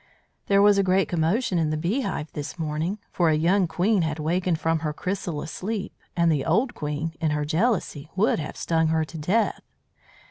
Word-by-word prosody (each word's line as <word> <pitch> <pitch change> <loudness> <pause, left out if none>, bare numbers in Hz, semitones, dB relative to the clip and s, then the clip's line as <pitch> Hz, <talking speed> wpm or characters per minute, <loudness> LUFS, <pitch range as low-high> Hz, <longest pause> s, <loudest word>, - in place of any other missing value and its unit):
"There 200 0 +5
was 205 -1 +6
a - - +4
great 190 0 +2
commotion 175 +4 +1
in 160 -2 +1
the 155 - -1
bee 180 - 0
hive 170 - -3
this 150 +3 -5
morning, 160 +4 -2
for 170 -2 +2
a 155 - +3
young 175 +4 +3
queen 180 +5 +1
had 160 -2 -1
wakened 170 +2 0
from 165 0 +1
her 155 -1 -2
chrysalis 175 -3 -4
sleep, 205 +1 -4 0.2
and 170 -1 +4
the 145 -4 +1
old 220 +10 +1
queen 150 +2 -3
in 160 - +2
her 150 0 0
jealousy 160 - 0
would 200 0 +2
have 150 - -6
stung 160 -1 +1
her 160 0 +1
to 165 +1 -9
death. 205 +9 +1
165 Hz, 200 wpm, -25 LUFS, 155-195 Hz, 0.2 s, was